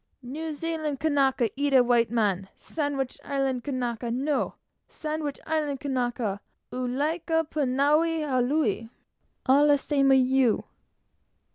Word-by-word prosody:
"New 310 +6 -5
Zealand 310 -2 -3
Kanaka 270 -6 +2
eat 280 -1 +3
white 235 -2 +3
man; 200 -5 0
Sandwich 285 -4 -3
Island 270 -3 -1
Kanaka 245 -4 -3
no. 275 +5 -1 0.3
Sandwich 305 -2 -4
Island 300 -4 -1
Kanaka 245 -7 -2 0.3
ua 250 0 -2
like 295 +7 -2 0.2
pu 300 -2 0
na 280 +4 +3
haole 280 -8 0 0.6
all 285 +3 +5
'e 290 - +5
same 275 -1 +2
a' - - +7
you!" 260 -2 +3
270 Hz, 120 wpm, -26 LUFS, 245-295 Hz, 0.6 s, a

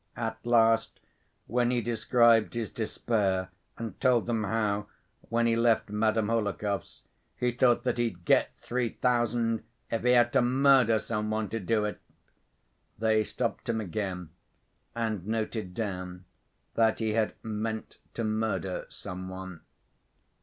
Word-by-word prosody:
At 110 -1 -4
last, 115 -1 +3 0.5
when 120 +1 +1
he 125 -1 +1
described 115 0 +3
his 115 -3 -2
despair 100 -4 -1 0.3
and 115 -5 -7
told 125 -3 +3
them 115 -2 -1
how, 105 -1 0 0.4
when 115 0 +2
he 115 -1 +3
left 115 -2 +2
Madame 110 0 +1
Hohlakov's, 105 -3 -2 0.3
he 125 0 0
thought 120 0 +3
that 125 -1 -1
he'd 95 -8 -2
"get - - +4
three 120 -1 -2
thousand 120 -2 +1 0.3
if 115 - 0
he 125 +1 +4
had 120 -1 +4
to - - +5
murder 130 -2 +4
some 105 0 -2
one 110 -1 -1
to 115 - -3
do 105 +2 +1
it," 105 - -4 1.0
they 110 0 +2
stopped 120 +2 -3
him 115 -1 +1
again 95 -4 -4 0.6
and 110 -5 -2
noted 110 -4 -3
down 90 -4 -4 0.5
that 110 -1 +3
he 110 -1 -1
had 110 -1 0
"meant 110 0 -4 0.2
to 115 - -2
murder 110 -4 -1
some 95 +1 -6
one." 95 -2 -8
110 Hz, 140 wpm, -29 LUFS, 105-115 Hz, 1.0 s, to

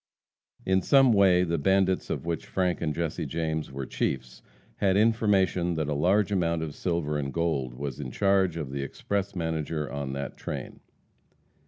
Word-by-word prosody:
In 95 0 +3
some 135 0 +5
way 95 -3 +5
the 85 -2 -1
bandits, 95 +3 +2
of - - -3
which 85 -2 -3
Frank 90 -3 0
and 75 - 0
Jesse 80 0 -3
James 80 -2 -2
were 65 0 -5
chiefs, 60 -1 -3 0.4
had 95 -1 +2
information 100 -6 +2
that 80 -2 -1
a - - 0
large 95 +8 +2
amount 85 -4 +1
of 75 -2 -5
silver 80 -4 -1
and 70 -1 -3
gold 70 -7 -1
was 70 0 -5
in 70 -3 -4
charge 95 +1 +2
of 75 -5 -4
the 70 0 -3
express 100 +8 -3
messenger 80 -2 -2
on 70 -2 -4
that 70 +1 -5
train. - - -6
85 Hz, 170 wpm, -27 LUFS, 75-95 Hz, 0.4 s, some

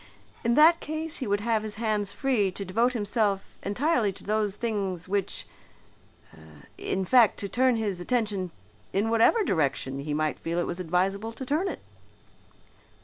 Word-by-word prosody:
In 235 0 +2
that 320 +3 +7
case 315 +1 -4
he 260 - -4
would 205 0 +1
have 225 0 +1
his 215 -1 -5
hands 210 -2 0
free 245 -8 +1
to 200 - -5
devote 230 +7 +1
himself 205 -3 0 0.2
entirely 235 +1 +1
to - - -13
those 210 -1 0
things, 200 -6 -2
which 200 0 -2 1.3
in 190 0 -2
fact 235 +2 +5
to 200 - -3
turn 255 +4 +2
his 205 -5 -1
attention 205 -3 -1 0.4
in 210 +4 +1
whatever 230 - +4
direction 140 - 0
he 145 +1 -3
might 155 0 -1
feel 165 +1 -3
it 175 - +1
was 175 - -4
advisable 190 +5 -1
to 260 - -7
turn 310 +9 0
it." - - -5
210 Hz, 160 wpm, -27 LUFS, 190-240 Hz, 1.3 s, that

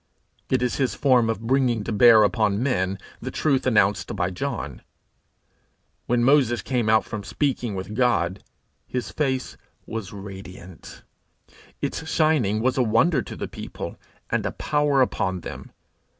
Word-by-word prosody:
It 130 -1 +1
is 125 - -1
his 130 -7 0
form 125 -2 +3
of 115 0 -3
bringing 125 -3 +2
to - - -4
bear 110 +1 +7
upon 105 0 +1
men 95 -8 0 0.2
the - - -4
truth 135 -4 0
announced 105 -5 +2
by 90 -2 -1
John. 70 -6 -4 1.3
When 120 0 +2
Moses 120 -5 +3
came 120 -4 0
out 110 0 +4
from 105 -2 -6
speaking 125 -4 -1
with 95 +2 -5
God, 100 -7 +1 0.4
his 125 -1 -4
face 135 -4 -2 0.3
was 110 -4 -5
radiant; 95 -3 -10 0.8
its 160 - -3
shining 140 -12 +2
was 130 +1 +1
a - - +5
wonder 125 +6 +3
to - - -8
the - - -5
people, - - -7 0.4
and - - +1
a - - -3
power 145 -2 +2
upon 95 -7 -2
them. - - -8
115 Hz, 150 wpm, -24 LUFS, 100-130 Hz, 1.3 s, bear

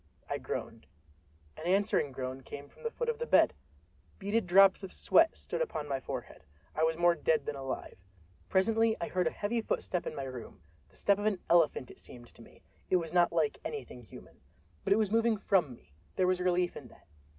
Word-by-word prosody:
I - - -3
groaned. 115 - -6 0.7
An 160 - -7
answering 190 -6 +2
groan 130 0 -5
came 140 +2 -9
from - - -21
the 465 - -2
foot 480 +1 -4
of 470 -1 -1
the 475 - -3
bed! - - +5 0.6
Beaded 205 +1 -1
drops 195 +2 +6
of 190 -2 -7
sweat 325 0 +3
stood - - -4
upon 280 - -3
my 135 -2 -1
forehead. 125 - -7 0.3
I - - -2
was 160 0 +2
more 175 0 +5
dead 155 -3 +1
than 145 - -3
alive. 135 -7 -6 0.5
Presently 225 +3 +2
I 225 - -3
heard 180 -2 +1
a - - 0
heavy 225 +3 -2
footstep 180 -4 -2
in - - -5
my 135 - -4
room—the 90 - -11
step 200 0 +2
of 205 - 0
an 205 -3 +1
elephant, 160 -7 +3
it - - -15
seemed 120 -1 -13
to - - -16
me—it - - -6
was 165 -2 -1
not 175 -1 +4
like 160 -3 0
anything 430 - -6
human. 115 - -14 0.4
But - - -2
it - - +2
was 215 -3 +1
moving 225 0 +3
from 190 -8 +2
me—there 80 - -5
was 185 0 +2
relief 180 -1 +1
in 130 - -9
that. - - -20
175 Hz, 200 wpm, -31 LUFS, 140-205 Hz, 0.7 s, drops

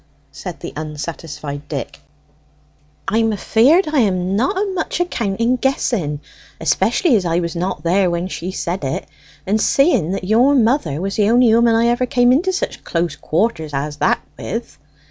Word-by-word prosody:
said 175 +5 -8
the 170 - -7
unsatisfied 150 -1 -6
Dick. 140 -5 -5 1.1
"I'm 225 +2 +2
afeard 265 - +3
I 305 -2 +1
am 190 -4 +1
not 265 - 0
o' 395 0 -1
much 365 - -3
account 230 - -2
in 240 +2 +2
guessing, 205 - -1 0.4
especially 335 -10 +2
as 200 - +2
I 170 -1 0
was 170 0 -3
not 180 +3 -3
there 180 +2 +2
when 170 +1 -2
she 180 -1 -5
said 180 -2 -3
it, 135 - -3 0.4
and 210 +3 +1
seeing 255 - +3
that 195 - -4
your 235 +9 +4
mother 225 - +1
was 195 +2 -3
the 210 -1 +3
only 240 0 +5
'ooman 230 0 +4
I 230 +1 +3
ever 240 +1 +1
cam' 245 0 +3
into 340 +9 +2
such 375 - -4
close 170 0 -1
quarters 160 -5 -1
as 145 +2 -3
that - - +1 0.2
with." - - -5
200 Hz, 170 wpm, -19 LUFS, 170-245 Hz, 1.1 s, only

